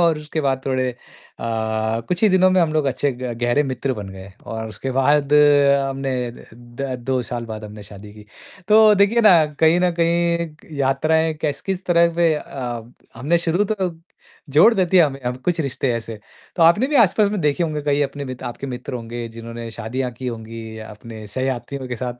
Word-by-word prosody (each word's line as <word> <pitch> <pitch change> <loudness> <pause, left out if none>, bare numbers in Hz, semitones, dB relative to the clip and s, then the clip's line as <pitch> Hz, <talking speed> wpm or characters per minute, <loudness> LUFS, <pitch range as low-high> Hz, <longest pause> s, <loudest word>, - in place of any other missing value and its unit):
और 165 -3 +3
उसके 150 +1 -4
बाद 135 -2 0
थोड़े 130 -1 0
अ, - - -12 1.1
कुछ 180 +2 -2
ही 215 - +6
दिनों 185 0 +4
में 185 0 +3
हम 165 -3 +1
लोग 155 -2 +1
अच्छे 135 +1 0
ग 125 0 -5
गहरे 120 +5 +2
मित्र 130 0 -2
बन 105 -3 -7
गए 95 0 -11
और 110 0 -5
उसके 110 +5 -5
बाद 145 +1 +2
हमने 140 -2 +3 0.2
द 120 - -14
द 120 +3 -6
2 130 0 0
साल 120 -1 -3
बाद 110 -1 -7
हमने 105 0 -10
शादी 105 0 -12
की। 105 -1 -14 0.4
तो 215 +1 +7
देखिए 205 +4 +3
ना 210 -5 +7 0.3
कहीं 165 +2 +4
न 180 0 +3
कहीं 170 -2 -1
यात्राएँ 155 +4 +1
कैस 145 -2 -1
किस 190 0 -3
तरह 170 -1 +3
पे 170 -2 +3
अ, 120 -5 -6 0.2
हमने 145 +9 +1
शुरू 175 +5 +2
तो 185 -4 -2 0.6
जोड़ 160 - +6
देती 185 -2 +2
है 175 - +8
हमें 135 -2 -4
हम 125 0 -1
कुछ 175 -2 +1
रिश्ते 135 -3 -1
ऐसे। 115 -1 -6 0.4
तो 170 - +2
आपने 185 +10 +5
भी 300 - -2
आस-पास 210 -2 +4
में 205 -3 -2
देखे 150 +3 +1
होंगे 155 -2 -2
कई 145 0 +1
अपने 140 0 -4
मित 130 -2 -7
आपके 120 +3 -6
मित्र 125 0 -6
होंगे 120 0 -5
जिन्होंने 115 0 -7
शादियाँ 125 +3 -4
की 125 +3 -8
होंगी 115 -1 -7
अपने 110 0 -10
सहयात्रियों 130 +3 -4
के 125 - -4
साथ। 125 +1 -5
135 Hz, 195 wpm, -21 LUFS, 120-165 Hz, 1.1 s, है